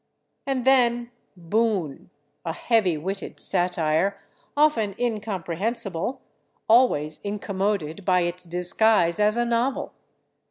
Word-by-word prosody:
And 260 -2 -1
then 240 -2 +3 0.3
"Boon," 185 -4 -1 0.3
a 165 - -3
heavy 200 -5 +1
witted 195 +6 -5
satire, 175 0 0 0.4
often 230 -10 +2
incomprehensible, 215 0 -2 0.4
always 185 - +3
incommoded 200 -4 -2
by 180 -1 +3
its 175 +1 -3
disguise 180 +1 +2
as 210 +2 +3
a 240 - +2
novel. 235 +3 -1
200 Hz, 95 wpm, -24 LUFS, 175-230 Hz, 0.4 s, then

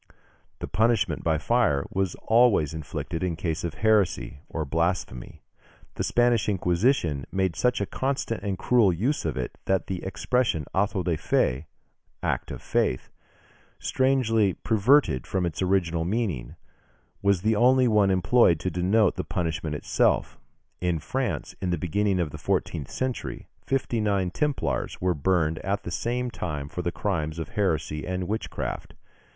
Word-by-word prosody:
The - - -5
punishment 105 -5 +1
by 80 -1 +2
fire 75 - +2
was 95 -2 -1
always 110 - +4
inflicted 80 +2 -5
in 90 -3 -1
cases 80 +1 -2
of 85 - -3
heresy, 105 -9 +2
or 80 -2 -3
blasphemy. 85 -4 -2 0.5
The - - -3
Spanish 120 -3 +2
Inquisition 90 - +1
made 95 -3 0
such 125 +7 +1
a 100 - 0
constant 130 -3 -2
and 100 -2 -2
cruel 115 -4 +4
use 115 - -1
of 75 -6 -2
it, 65 -1 -4
that 95 -1 +1
the 95 -2 -4
expression 100 - 0
auto 95 -1 +1
da 90 - -1
fé 65 +1 +1 0.6
(act - - -1
of - - -7
faith), 65 - 0 0.7
strangely 115 -7 +2
perverted 110 - +2
from 95 -2 0
its 85 0 -3
original 90 -3 +1
meaning, 90 - -2 0.7
was 100 -2 +2
the 110 0 +3
only 125 +3 +5
one 105 -3 +4
employed 95 -2 +4
to 95 - -1
denote 95 +5 +2
the - - -1
punishment 80 -4 -2
itself. - - +1 0.4
In 90 -2 0
France, 120 - -3
in 95 - -1
the 90 - +1
beginning 95 +4 0
of 80 -4 -1
the - - -8
fourteenth 75 -5 -1
century, 130 -1 -4 0.2
fifty 130 -4 0
nine 100 -4 +1
Templars 145 +6 -1
were 90 0 +1
burned 80 0 +1
at 100 +1 -2
the 90 - -5
same 120 +5 -2
time 75 -9 -4
for 90 - -4
the 85 0 -1
crimes 80 -6 -2
of 80 -3 -5
heresy 80 -6 -1
and 90 0 -2
witchcraft. 110 +2 -4
95 Hz, 155 wpm, -26 LUFS, 80-110 Hz, 0.7 s, only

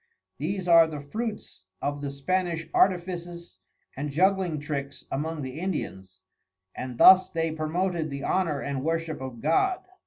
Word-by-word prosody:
These 180 +5 -3
are 165 -1 +7
the 155 -2 -6
Fruits 210 - -6
of 145 0 -3
the 140 - -3
Spanish 165 +3 -1
Artifices 175 - 0 0.4
and 145 +2 -3
Juggling 180 +1 +2
Tricks 140 -2 -5
among 155 +2 -3
the 130 +3 -6
Indians, 95 - -5 0.5
and 125 -2 -6
thus 185 +4 +8
they 165 -3 -1
promoted 160 +1 -1
the 140 0 -5
honour 160 -7 0
and 140 -2 -3
worship 165 -2 -2
of 130 -3 -7
God. 260 - +2
160 Hz, 145 wpm, -27 LUFS, 140-180 Hz, 0.5 s, thus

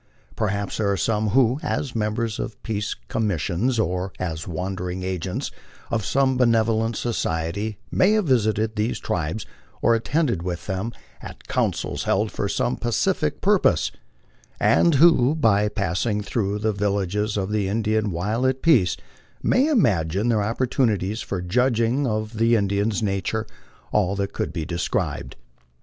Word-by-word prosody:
Perhaps 100 -1 -2
there 100 -2 +1
are 100 - 0
some 110 +3 0
who, 125 +3 +3
as 135 -5 -2
members 110 +1 -1
of - - -6
peace 105 -2 -2
commissions 105 - 0
or 90 -2 -1
as 80 -3 -4
wandering 90 +1 -4
agents 95 -1 -3 0.4
of 115 -2 0
some 130 +4 +2
benevolent 115 -2 +2
society, 100 -1 -2
may 190 +3 +4
have 215 -3 +2
visited 110 -4 +1
these 110 +3 0
tribes 85 +5 -3 0.3
or 115 - +3
attended 115 - 0
with 85 -1 -4
them 95 +4 -3 0.3
at - - -11
councils - - -1
held 105 +3 +1
for 100 - -2
some 120 - 0
pacific 150 - 0
purpose, 190 - +3 0.7
and 170 -3 +4
who, 145 -2 +5
by 105 -8 +3
passing 105 +2 -1
through 100 0 -1
the 110 +1 0
vil 100 0 0
lages 105 +2 -1
of 95 0 -2
the 105 -2 0
Indian 110 +1 0
while 105 +9 0
at 130 0 -1
peace, 120 - +4 0.5
may 265 +4 +3
imagine 105 - +2
their 110 -3 +2
opportunities 110 -2 0
for 90 -3 -4
judging 120 +6 +1
of 110 0 -3
the 115 +1 +4
Indian 100 0 +1
nature 100 +2 -1 0.5
all 100 -2 +2
that 100 0 -2
could - - -2
be 80 -3 -4
desired. 85 -7 -2
105 Hz, 145 wpm, -23 LUFS, 95-120 Hz, 0.7 s, who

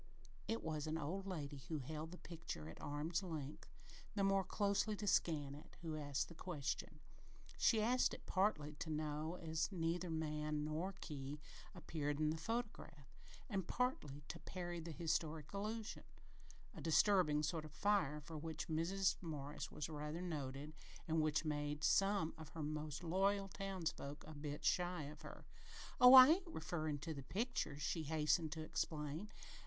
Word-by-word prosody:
It 225 +1 -1
was 155 -1 -2
an 155 +1 0
old 180 +6 -3
lady 150 -6 -4
who 160 - -1
held 155 +3 -4
the 180 - -9
picture 165 - -6
at 80 - -9
arm's 155 +4 -1
length, 155 -6 -5 0.5
the 200 - +2
more 195 0 +4
closely 205 +2 +1
to 205 - -4
scan 150 -7 +2
it, 145 - -12
who 160 -2 -3
asked 145 -2 -1
the - - -10
question. 155 -2 -3 0.6
She 220 -3 +5
asked 250 +3 +4
it - - -14
partly 185 -7 +1
to 160 - -3
know, 155 +1 -2
as 160 +2 0
neither 175 0 -1
man 150 -1 -1
nor 160 +6 -2
key 145 -1 -5 0.4
appeared 150 -4 -2
in 155 0 +3
the 160 - -2
photograph, 210 - -4 0.3
and 195 -6 -2
partly 150 - -1
to - - -5
parry 175 -2 -4
the 165 +1 -6
"historic 160 -1 -1
allusion" 215 +2 -3 0.7
a - - -8
disturbing 160 -3 +4
sort 155 +1 0
of 155 - -9
fire 200 -8 +2
for 155 +1 -7
which 160 0 -4
Mrs. 185 +5 +2
Morris 145 -3 -4
was 150 - -4
rather 150 +1 -4
noted 145 -3 -4 0.3
and 160 0 +3
which 155 +1 +2
made 145 0 -1
some 195 -4 +3
of 160 - -8
her 160 - -5
most 150 +1 -3
loyal 195 +3 +2
townsfolk 180 -7 -4
a 155 - -8
bit 145 0 -5
shy 180 -2 +2
of 150 +2 -8
her. - - -9 0.5
"Oh, 250 +1 +11
I 260 +1 +13
ain't 355 +3 +3
referrin' 155 - -2
to 165 - -3
the 140 - -6
picture," 200 - -1
she 160 +2 -1
hastened 155 +1 +2
to 160 - -5
explain. 155 +3 -2
160 Hz, 165 wpm, -41 LUFS, 150-185 Hz, 0.7 s, I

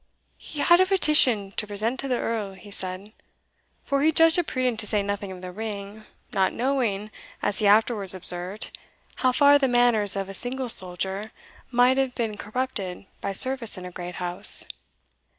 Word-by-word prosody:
"He 295 - -6
had 345 0 +6
a 375 - +3
petition 265 - +3
to 210 - -1
present 215 +5 +1
to 275 - -1
the 250 -2 0
Earl," 215 -5 -3
he 195 +2 -14
said; 190 +2 -7 0.7
for 280 -1 0
he 315 +2 +4
judged 325 +2 +5
it 345 - -1
prudent 255 -3 -1
to 215 - +1
say 205 -1 0
nothing 200 -1 -4
of 185 -1 -10
the 180 - -6
ring, 210 +1 -7 0.3
not 190 -1 +2
knowing, 230 -6 -1 0.3
as 205 -2 0
he 210 - +2
afterwards 205 -2 +3
observed, 180 +3 -2 0.4
how 255 - +2
far 285 +2 +5
the 270 - +2
manners 240 -5 +4
of 195 -1 -3
a 195 - -8
single 250 +5 -2
soldier* 190 +2 -2 0.4
might 250 +1 +4
have 265 -2 0
been 225 -3 -2
corrupted 210 -5 -4 0.2
by 200 - -2
service 255 +1 -1
in 180 - -8
a 180 - -7
great 180 0 -7
house. 180 0 0
215 Hz, 180 wpm, -25 LUFS, 195-255 Hz, 0.7 s, had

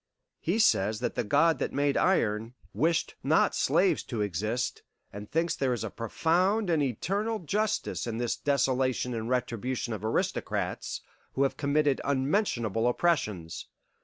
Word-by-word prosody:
He 175 +6 0
says 110 - +3
that 125 - -1
the - - -1
God 150 +9 +3
that - - -2
made 140 0 +1
iron 115 - +1 0.2
wished 160 +10 +1
not - - +3
slaves - - +2
to 115 - -3
exist, 105 +5 -2 0.3
and 105 +1 -8
thinks 165 +2 0
there 130 -2 0
is 120 - -3
a - - -4
profound 180 - +1
and 160 -2 +2
eternal 195 - -1
justice 210 - -1
in 115 -1 -3
this 120 -1 -1
desolation 130 -3 0
and 115 0 -3
retribution 125 -1 -2
of 105 -1 -6
aristocrats 110 - -2 0.3
who 135 - +1
have 135 - +1
committed 145 -1 +1
unmentionable 130 - 0
oppressions. 110 - 0
130 Hz, 145 wpm, -29 LUFS, 115-165 Hz, 0.3 s, says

